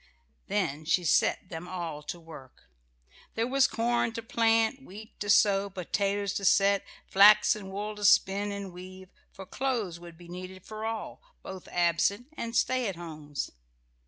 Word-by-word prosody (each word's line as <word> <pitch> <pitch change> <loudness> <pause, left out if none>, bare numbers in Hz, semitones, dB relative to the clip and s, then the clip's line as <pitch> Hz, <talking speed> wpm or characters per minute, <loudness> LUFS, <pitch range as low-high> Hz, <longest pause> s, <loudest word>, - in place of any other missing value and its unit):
Then 185 -7 -1
she 170 +3 +1
set 180 +2 +2
them 165 0 -7
all 170 -5 -5
to 150 +4 -7
work. 155 -6 -13 0.7
There 225 - +1
was 270 +2 +3
corn 235 0 0
to 230 - -5
plant, 225 +1 +2
wheat 215 0 -12
to 205 - -4
sow, 200 0 +4
potatoes 200 +2 -1
to 200 - -3
set; 200 0 +4 0.2
flax 205 +3 +6
and 195 -3 -8
wool 210 +2 -4
to 210 - -8
spin 200 +1 +4
and 200 -2 -6
weave, 185 +1 -11 0.2
for 190 - -10
clothes 220 -6 -2
would 170 -1 -12
be 175 0 -14
needed 185 +1 -9
for 215 0 -6
all, 225 -1 -5 0.2
both 190 -1 -9
absent 180 - +1
and 230 -4 -5
stay 255 -1 +1
at 195 - -3
homes. 155 -4 -6
195 Hz, 160 wpm, -29 LUFS, 175-215 Hz, 0.7 s, flax